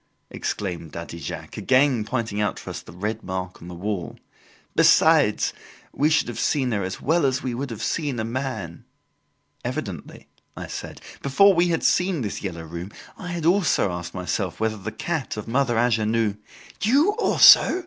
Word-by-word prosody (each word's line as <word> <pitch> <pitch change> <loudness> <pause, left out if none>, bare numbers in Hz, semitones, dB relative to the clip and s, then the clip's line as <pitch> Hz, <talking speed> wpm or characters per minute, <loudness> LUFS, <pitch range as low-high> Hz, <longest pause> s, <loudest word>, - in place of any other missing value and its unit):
exclaimed 85 -6 -4
Daddy 85 0 -7
Jacques, - - -7
again 130 -3 +3
pointing 110 -4 -2
out 105 - -1
to - - -7
us - - -6
the - - -13
red 105 +5 -4
mark 95 -1 -5
on 85 - -10
the 90 - -8
wall. 95 0 -4 0.6
"Besides, - - +4 0.4
we 150 +2 +2
should 160 - +2
have 120 - -5
seen 135 -5 +1
her 105 -3 0
as 95 0 -4
well 165 +2 +1
as 130 -1 +1
we 125 - -2
would 135 +3 -4
have 115 -3 -6
seen 145 -7 -1
a - - -1
man 115 -8 -4 0.4
" - - -42
"Evidently," - - -6 0.3
I - - -5
said. - - -7 0.2
"Before 195 +9 +5
we 175 0 +3
had 165 -2 0
seen 180 -4 +2
this 105 -4 -4
"Yellow 85 -4 -5
Room", 85 +4 -7 0.2
I 180 - -9
had 175 -2 -4
also 175 - +3
asked 90 0 -6
myself 90 0 -3
whether 110 0 0
the 95 - -6
cat 160 -9 -3
of 105 - -6
Mother 120 0 +1
Angenoux 115 -2 +1 0.2
" - - -21
"You 280 - +4
also!" 370 - +7
115 Hz, 180 wpm, -24 LUFS, 95-140 Hz, 0.6 s, also